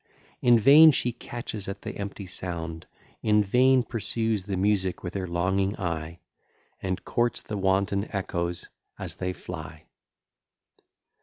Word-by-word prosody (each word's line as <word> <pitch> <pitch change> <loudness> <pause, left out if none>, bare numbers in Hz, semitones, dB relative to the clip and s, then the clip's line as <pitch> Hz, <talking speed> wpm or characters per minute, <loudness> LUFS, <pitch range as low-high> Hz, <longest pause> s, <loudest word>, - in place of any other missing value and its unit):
In 120 -1 +6
vain 145 +7 +8
she 125 -4 +2
catches 115 -3 -6
at 100 +1 -6
the - - -4
empty 100 0 -6
sound, 85 -3 -5 0.3
In 105 -1 +3
vain 125 +5 +4
pursues 115 -3 -2
the 100 -2 -2
music 95 -1 +1
with 85 - -5
her 95 -2 -3
longing 95 +4 0
eye, 85 -2 -4 0.6
And 95 0 -3
courts 120 0 0
the 105 - -5
wanton 100 +1 +1
echoes 85 -3 -3 0.3
as - - -7
they 90 0 -2
fly. 80 -3 -8
100 Hz, 135 wpm, -27 LUFS, 90-110 Hz, 0.6 s, vain